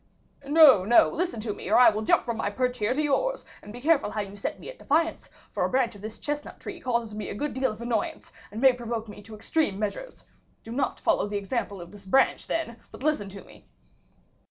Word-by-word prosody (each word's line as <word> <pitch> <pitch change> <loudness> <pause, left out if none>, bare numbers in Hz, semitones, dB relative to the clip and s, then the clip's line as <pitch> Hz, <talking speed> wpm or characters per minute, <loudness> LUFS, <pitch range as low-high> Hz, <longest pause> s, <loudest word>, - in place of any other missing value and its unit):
"No, 290 - +7
no! 235 +5 +5
listen 350 -6 -2
to 210 -1 -3
me, - - -8
or 215 - +5
I 245 -2 +8
will 215 +1 -3
jump 215 - +3
from 235 -2 -3
my 210 - -1
perch 250 +3 -1
here 210 0 +1
to 300 - +1
yours; - - 0 0.2
and 210 - -11
be 240 - -9
careful 290 -2 +2
how 210 - -2
you 200 0 -8
set 200 - -4
me - - -11
at - - -9
defiance, 325 +3 0 0.2
for - - -1
a - - +1
branch 255 -2 +1
of 205 - -13
this 215 +1 -7
chestnut 295 0 -5
tree - - -8
causes 235 -3 -1
me 210 0 -5
a - - -5
good 295 +7 -3
deal 260 -2 0
of 215 +2 -8
annoyance, 235 -3 -3 0.2
and 210 - -7
may 265 0 +6
provoke 235 -2 -4
me 205 0 -10
to 215 +1 -11
extreme 220 - -1
measures. 215 - -5 0.4
Do 225 - -9
not 265 +3 -1
follow - - +1
the 205 0 -2
example 200 -1 -3
of 175 0 -10
this 205 -1 -14
branch, 265 +8 +2
then, 315 -9 -2
but - - -11
listen 295 -10 0
to 195 +1 -10
me." - - -18
235 Hz, 240 wpm, -26 LUFS, 210-275 Hz, 0.4 s, I